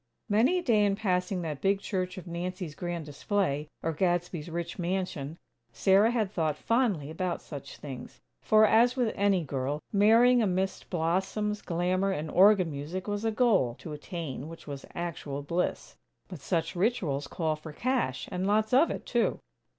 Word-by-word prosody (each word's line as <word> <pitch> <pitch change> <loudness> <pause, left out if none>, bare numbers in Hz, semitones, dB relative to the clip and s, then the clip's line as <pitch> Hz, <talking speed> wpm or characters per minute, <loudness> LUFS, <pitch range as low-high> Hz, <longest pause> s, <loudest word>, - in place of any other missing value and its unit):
Many 235 - +3
a 355 - -2
day 220 -7 +3
in 200 -1 +2
passing 185 -3 -1
that 150 -4 -4
big 195 0 +2
church 185 -2 -3
of 185 - -7
Nancy's 180 -1 -4
grand 175 -1 -4
display, 150 -1 -1 0.2
or 165 - 0
Gadsby's 175 -1 -1
rich 170 +1 -4
mansion, 175 -4 -2 0.3
Sarah 195 - +4
had 220 -5 0
thought 155 -6 0
fondly 210 - 0
about 175 +2 -2
such 145 -4 -9
things; 130 -4 -9 0.2
for, 215 0 +5
as 235 +4 +4
with 245 -4 +1
any 195 -3 +2
girl, 140 0 -2
marrying 230 +4 +6
amidst 190 -2 -1
blossoms, 190 +5 -1
glamour 180 +3 0
and 155 -4 -3
organ 190 -3 +5
music 155 +7 -5
was 205 +1 -2
a 225 - +2
goal, 215 - +2
to 155 - -8
attain 150 -2 -6
which 165 - -11
was 140 -2 -7
actual 155 -5 -4
bliss. 170 +5 -2 0.3
But 180 -5 -8
such 165 +2 -1
rituals 175 - 0
call 160 -2 -1
for 155 +1 -10
cash; 235 - -1
and 185 +1 -1
lots 215 +2 +2
of 280 +6 +6
it, - - -5
too. - - +1
180 Hz, 165 wpm, -29 LUFS, 155-205 Hz, 0.3 s, marrying